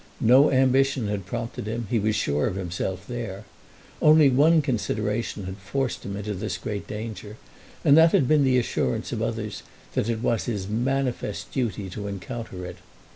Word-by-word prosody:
No 130 Hz, +6 st, +6 dB
ambition 130 Hz, -2 st, +2 dB
had 100 Hz, -3 st, -3 dB
prompted 115 Hz, 0 st, -4 dB
him. 115 Hz, +1 st, -3 dB
He 120 Hz, -, +2 dB
was 105 Hz, +1 st, +1 dB
sure 75 Hz, -5 st, +1 dB
of -, -, -3 dB
himself 95 Hz, 0 st, -4 dB
there. 115 Hz, -5 st, -5 dB, 0.6 s
One 155 Hz, +1 st, +6 dB
only 160 Hz, +5 st, +5 dB
consideration 110 Hz, -5 st, -2 dB
had 95 Hz, +1 st, -6 dB
forced 120 Hz, +6 st, -3 dB
him 100 Hz, 0 st, -5 dB
into 105 Hz, +1 st, -4 dB
this 95 Hz, -, -3 dB
great 105 Hz, -4 st, -5 dB
danger, 105 Hz, -1 st, -6 dB, 0.5 s
and 140 Hz, -, +7 dB
that 160 Hz, +1 st, +7 dB
had 130 Hz, -, +3 dB
been 150 Hz, 0 st, +4 dB
the 130 Hz, -1 st, +3 dB
assurance 110 Hz, -, -1 dB
of -, -, -3 dB
others -, -, -3 dB, 0.3 s
that 110 Hz, -, 0 dB
it 115 Hz, 0 st, -2 dB
was 115 Hz, -2 st, +1 dB
his 105 Hz, -6 st, -3 dB
manifest 125 Hz, 0 st, -2 dB
duty 105 Hz, -6 st, -2 dB
to 100 Hz, +2 st, -5 dB
encounter 100 Hz, -1 st, -6 dB
it. 90 Hz, 0 st, -8 dB
110 Hz, 175 wpm, -25 LUFS, 100-130 Hz, 0.6 s, and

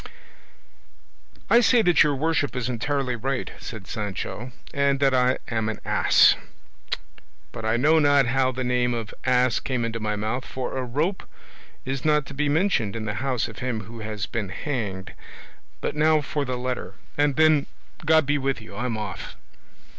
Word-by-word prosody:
"I 235 Hz, -, +6 dB
say 240 Hz, -1 st, +4 dB
that 175 Hz, -3 st, +5 dB
your 150 Hz, -2 st, +4 dB
worship 145 Hz, -1 st, 0 dB
is 125 Hz, -1 st, -1 dB
entirely 130 Hz, +1 st, -1 dB
right," 130 Hz, +2 st, -2 dB
said 110 Hz, -5 st, -8 dB
Sancho, 105 Hz, +4 st, -5 dB, 0.2 s
"and 140 Hz, -1 st, +2 dB
that 135 Hz, -1 st, +3 dB
I 125 Hz, 0 st, +3 dB
am 110 Hz, -2 st, -1 dB
an 110 Hz, -, -4 dB
ass. -, -, +5 dB, 1.2 s
But 110 Hz, -, -7 dB
I 110 Hz, +1 st, +2 dB
know 155 Hz, +6 st, +4 dB
not 145 Hz, -2 st, +5 dB
how 130 Hz, +1 st, +2 dB
the 130 Hz, 0 st, -3 dB
name 125 Hz, -1 st, +1 dB
of 115 Hz, -2 st, -5 dB
ass 125 Hz, -1 st, +3 dB
came 125 Hz, -3 st, -2 dB
into 115 Hz, 0 st, -3 dB
my 105 Hz, -1 st, -1 dB
mouth, 110 Hz, +5 st, -2 dB
for 130 Hz, -1 st, -5 dB
a 130 Hz, -, -1 dB
rope 150 Hz, +10 st, -1 dB, 0.6 s
is 135 Hz, 0 st, -3 dB
not 150 Hz, -2 st, +3 dB
to 140 Hz, -, -9 dB
be 145 Hz, +2 st, 0 dB
mentioned 145 Hz, -, +1 dB
in 110 Hz, -1 st, -4 dB
the 105 Hz, -, -2 dB
house 130 Hz, -4 st, 0 dB
of -, -, -10 dB
him 125 Hz, -3 st, -2 dB
who 115 Hz, +3 st, -10 dB
has 110 Hz, -2 st, -4 dB
been 105 Hz, -4 st, -4 dB
hanged; 100 Hz, -4 st, -4 dB, 0.7 s
but -, -, -2 dB
now 155 Hz, +1 st, +4 dB
for 145 Hz, 0 st, -2 dB
the 130 Hz, -1 st, -2 dB
letter, 125 Hz, 0 st, -4 dB, 0.2 s
and 145 Hz, -1 st, +2 dB
then, 155 Hz, -2 st, +4 dB, 0.4 s
God 160 Hz, -1 st, +4 dB
be 145 Hz, +1 st, +1 dB
with 135 Hz, -1 st, -1 dB
you, 110 Hz, -2 st, -12 dB
I 105 Hz, +5 st, -3 dB
am 115 Hz, -3 st, -2 dB
off." 105 Hz, -3 st, -6 dB
130 Hz, 180 wpm, -25 LUFS, 115-145 Hz, 1.2 s, I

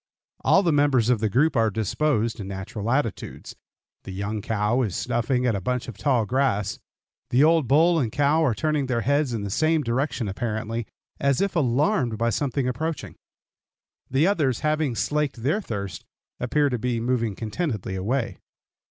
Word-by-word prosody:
All 195 Hz, -, +5 dB
the 170 Hz, -, +2 dB
members 140 Hz, -5 st, +3 dB
of 120 Hz, -, +2 dB
the 110 Hz, 0 st, 0 dB
group 140 Hz, +9 st, +2 dB
are 115 Hz, -2 st, +3 dB
disposed 115 Hz, +2 st, 0 dB
in 100 Hz, -, -5 dB
natural 100 Hz, +3 st, -5 dB
attitudes. 120 Hz, -4 st, -2 dB, 0.5 s
The -, -, -8 dB
young 100 Hz, +3 st, -3 dB
cow 110 Hz, +3 st, 0 dB
is 105 Hz, -8 st, -1 dB
snuffing 125 Hz, +1 st, 0 dB
at 120 Hz, -, +2 dB
a 100 Hz, -, -2 dB
bunch 125 Hz, +5 st, -2 dB
of 120 Hz, -, -7 dB
tall 115 Hz, +2 st, +1 dB
grass; 115 Hz, -5 st, 0 dB, 0.5 s
the 130 Hz, +4 st, +4 dB
old 160 Hz, -3 st, +4 dB
bull 165 Hz, +6 st, +4 dB
and 120 Hz, -7 st, -1 dB
cow 145 Hz, +4 st, +2 dB
are 130 Hz, -8 st, +2 dB
turning 150 Hz, +2 st, 0 dB
their 120 Hz, -2 st, 0 dB
heads 140 Hz, +2 st, +1 dB
in 110 Hz, -3 st, -3 dB
the 100 Hz, -, -4 dB
same 155 Hz, +5 st, +2 dB
direction 125 Hz, -1 st, -1 dB
apparently, 110 Hz, +2 st, -3 dB, 0.3 s
as 140 Hz, -2 st, +2 dB
if 195 Hz, -1 st, 0 dB
alarmed 135 Hz, -, +1 dB
by 115 Hz, +1 st, +1 dB
something 140 Hz, 0 st, -1 dB
approaching; 155 Hz, +6 st, -3 dB, 0.9 s
the 135 Hz, +4 st, +3 dB
others, 150 Hz, -, +1 dB
having 155 Hz, -4 st, 0 dB
slaked 145 Hz, -3 st, -1 dB
their 155 Hz, -, +1 dB
thirst, 100 Hz, -, -5 dB, 0.4 s
appear 145 Hz, +4 st, +1 dB
to 125 Hz, -3 st, -2 dB
be 120 Hz, 0 st, -1 dB
moving 115 Hz, -3 st, 0 dB
contentedly 110 Hz, -, -3 dB
away. 115 Hz, +7 st, -2 dB
125 Hz, 170 wpm, -24 LUFS, 110-145 Hz, 0.9 s, All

